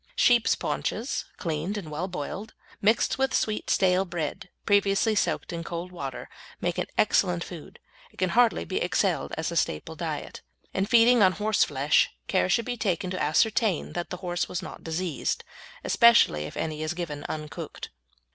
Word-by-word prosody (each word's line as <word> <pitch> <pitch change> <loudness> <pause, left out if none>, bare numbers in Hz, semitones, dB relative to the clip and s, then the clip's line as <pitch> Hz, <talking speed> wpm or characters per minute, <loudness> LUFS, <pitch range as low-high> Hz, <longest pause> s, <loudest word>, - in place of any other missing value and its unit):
Sheep's 240 -2 +4
paunches, - - -2
cleaned 165 +4 -2
and 165 -7 -6
well 165 +5 -3
boiled, 190 +5 -6 0.3
mixed 220 +5 +2
with 265 0 +1
sweet 215 -1 -1
stale 185 -1 +3
bread, 175 -2 -4 0.2
previously 205 +2 +3
soaked 200 - -1
in 170 0 -4
cold 170 +2 -5
water, 140 -7 -6 0.3
make - - -1
an - - -1
excellent 85 - +2
food - - -10 0.3
and - - -26
can 185 - +1
hardly 235 - +3
be - - -3
excelled - - 0
as - - -2
a - - -4
staple 75 - -1
diet. - - -5 0.3
In 190 +1 0
feeding 235 +1 +6
on 185 -2 +6
horseflesh 150 -10 +2 0.2
care 185 -1 +1
should 230 +4 +2
be 245 -1 -3
taken 185 -4 -1
to 185 - -3
ascertain 210 - +1
that 175 0 -4
the 180 - -5
horse 175 0 -1
was 180 +1 -3
not - - -9
diseased, 165 -1 -2 0.4
especially 235 - +5
if - - -8
any 155 -1 -3
is 155 +2 -2
given 160 -5 -5
uncooked. 155 -1 -6
180 Hz, 165 wpm, -27 LUFS, 160-215 Hz, 0.4 s, feeding